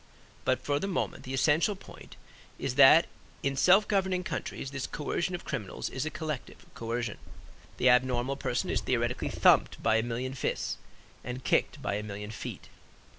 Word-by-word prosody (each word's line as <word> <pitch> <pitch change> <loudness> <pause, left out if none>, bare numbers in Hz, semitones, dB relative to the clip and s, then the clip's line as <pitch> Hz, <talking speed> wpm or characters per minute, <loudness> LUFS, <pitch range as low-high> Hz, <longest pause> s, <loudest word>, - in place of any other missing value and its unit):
But - - +2
for 145 0 +1
the 195 - -2
moment 195 - -2
the 130 - -5
essential 155 +9 +3
point 195 - -13 0.4
is 135 - -2
that 140 +5 +8 0.4
in 140 0 0
self 185 +9 +5
governing 190 -2 +1
countries 135 - -4
this 135 -2 -3
coercion 170 +4 -2
of 175 - -8
criminals 120 -9 -4
is 130 +4 -2
a - - 0
collective 155 -5 -6
coercion. 115 -1 -3 0.6
The 130 - +4
abnormal 125 +1 +2
person 125 -3 -1
is - - 0
theoretically 120 -1 -1
thumped - - +3
by 110 0 +4
a - - +3
million 120 +3 -3
fists 130 - -2 0.5
and 125 +1 -6
kicked - - +1
by 100 - -1
a - - -3
million 105 0 -6
feet. 110 - -7
130 Hz, 170 wpm, -29 LUFS, 120-155 Hz, 0.6 s, that